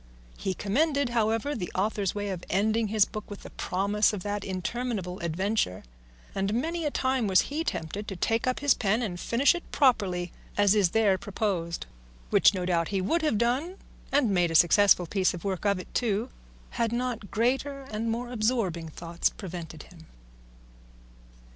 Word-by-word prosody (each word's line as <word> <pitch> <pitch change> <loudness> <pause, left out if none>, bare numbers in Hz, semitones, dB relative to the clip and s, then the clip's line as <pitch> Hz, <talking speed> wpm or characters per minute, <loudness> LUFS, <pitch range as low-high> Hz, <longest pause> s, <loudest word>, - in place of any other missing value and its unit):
He 190 - -3
commended, 280 - +1
however, 225 +4 0
the 185 -10 -4
author's 200 0 0
way 205 0 -2
of 185 -3 -4
ending 220 +3 +1
his 210 -1 +3
book 215 -1 -8
with 205 - -9
the - - -10
promise 205 +3 +1
of 195 -4 -4
that 205 -1 -3
interminable 190 0 -3
adventure, 170 - -1 0.5
and 195 +2 -1
many 325 +6 -1
a - - +2
time 260 -4 0
was 190 -2 +5
he 305 +3 -3
tempted 200 - -4
to 195 - -4
take 225 +6 0
up 255 - 0
his 285 -3 +5
pen 215 +3 0
and 180 -5 -4
finish 240 +9 +3
it 350 - -4
properly 190 - +2 0.3
as 205 -1 +5
is 205 -5 +3
there 200 -2 +3
proposed, 185 -5 -2 0.5
which - - +6
no 185 -3 -3
doubt 170 -2 +1
he 195 - -1
would 325 - +1
have 305 -9 +1
done, 260 - 0 0.4
and 275 -6 +3
made 175 -3 +2
a 165 - -3
successful 180 +2 +6
piece 185 +1 +1
of 170 - -9
work 195 -1 -3
of 200 -1 +2
it 185 - -9
too, 230 0 0 0.4
had 230 -2 0
not 240 -4 -3
greater 270 +5 0
and 220 +2 -2
more 240 +2 -3
absorbing 215 -8 0
thoughts 170 +2 -1
prevented 170 -5 -8
him. 160 -3 -16
205 Hz, 175 wpm, -28 LUFS, 185-240 Hz, 0.5 s, which